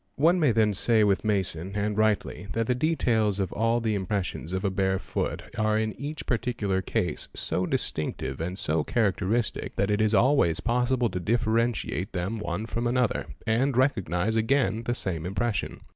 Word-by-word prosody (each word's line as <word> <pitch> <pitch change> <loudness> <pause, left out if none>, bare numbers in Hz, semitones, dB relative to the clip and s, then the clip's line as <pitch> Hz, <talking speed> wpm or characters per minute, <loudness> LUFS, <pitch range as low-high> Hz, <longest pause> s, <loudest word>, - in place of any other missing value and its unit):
One 170 +5 +4
may 150 -6 +4
then 110 -1 +3
say 110 +3 +3
with 100 -2 +2
Masson, 95 -3 0
and 105 0 -1
rightly, 105 -2 0
that 115 0 0
the 125 - +1
details 115 -8 +1
of 95 -3 -2
all 115 +2 +1
the 110 -2 0
impressions 95 -4 -2
of 95 +2 -2
a 100 - +1
bare 95 0 +1
foot 95 - -3 0.2
are 110 0 +2
in 110 -1 -1
each 150 +2 -5
particular 115 -6 -1
case - - -2
so - - -1
distinctive 70 -2 -2
and 90 +3 -3
so 75 -4 0
characteristic 110 +1 0
that 100 +1 +1
it 105 +1 +2
is 110 0 +3
always 120 - +3
possible 125 0 +1
to 90 - -3
differentiate 115 -3 0
them, 95 +5 -2
one 95 +2 -3
from 115 +1 -2
another, 125 -1 0 0.2
and 120 +4 +1
recognise 110 - +1
again 115 0 +1
the 120 - 0
same 85 -8 -3
impression. 100 +4 -2
110 Hz, 175 wpm, -27 LUFS, 95-120 Hz, 0.2 s, One